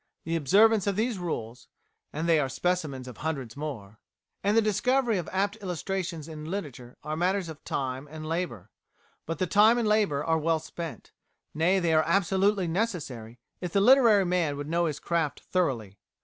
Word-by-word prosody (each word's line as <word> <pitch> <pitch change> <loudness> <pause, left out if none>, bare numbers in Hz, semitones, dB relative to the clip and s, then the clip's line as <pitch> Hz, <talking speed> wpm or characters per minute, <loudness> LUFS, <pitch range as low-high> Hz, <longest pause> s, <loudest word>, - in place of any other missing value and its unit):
The 165 +1 -2
observance 205 +8 +4
of 200 - +1
these 220 0 -1
rules 125 -9 -5 0.4
(and 160 +3 -3
they 165 -2 +4
are 135 -2 0
specimens 140 -3 -2
of 125 - -9
hundreds 140 -8 -4
more) 115 -9 -7 0.4
and 205 +3 +2
the - - +6
discovery 235 +1 +1
of 170 - -5
apt 200 +3 0
illustrations 180 -4 -4
in 155 -2 -8
literature 140 -10 -6
are 155 +1 -3
matters 180 +1 0
of 155 -2 -10
time 130 +1 -3
and 155 0 -8
labour. 145 - -4 0.6
But 165 0 -3
the 185 - 0
time 210 +6 +5
and 235 -2 +1
labour 205 -10 +2
are 160 0 +2
well 165 +1 +1
spent 160 0 -8 0.4
nay, 170 +5 +2
they 170 -3 +1
are 155 - +5
absolutely 195 +2 +2
necessary 155 - -3 0.2
if 180 -2 -5
the 200 - +4
literary 225 -3 +6
man 175 -5 0
would 145 0 -5
know 170 +1 +1
his 150 - -3
craft 165 -4 -1
thoroughly. 120 - -1
165 Hz, 175 wpm, -27 LUFS, 145-195 Hz, 0.6 s, the